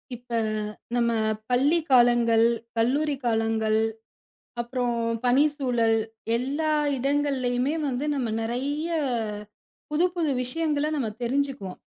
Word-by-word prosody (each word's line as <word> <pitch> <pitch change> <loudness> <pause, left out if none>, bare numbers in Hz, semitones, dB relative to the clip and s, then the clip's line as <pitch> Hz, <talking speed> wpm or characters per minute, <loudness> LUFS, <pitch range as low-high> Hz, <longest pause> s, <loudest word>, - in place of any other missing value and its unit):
இப்ப 245 +1 -16 0.6
நம்ம 235 -1 +2 0.4
பள்ளி 280 +7 +3
காலங்கள், 240 -2 +5 0.3
கல்லூரி 280 +6 +2
காலங்கள், 220 -1 +1 0.8
அப்புறம் 240 0 -2 0.3
பணி 250 +4 +5
சூழல் 240 -5 +1 0.4
எல்லா 285 +6 -1 0.3
இடங்கள்லயுமே 270 -1 0
வந்து 260 +1 -2
நம்ம 250 -4 -1
நறைய 275 +7 -2 1.0
புதுப்புது 340 0 +1
விஷயங்கள 300 +2 -1
நம்ம 255 -7 -1
தெரிஞ்சுக்குவோம். 255 -7 -2
250 Hz, 90 wpm, -26 LUFS, 235-285 Hz, 1.0 s, காலங்கள்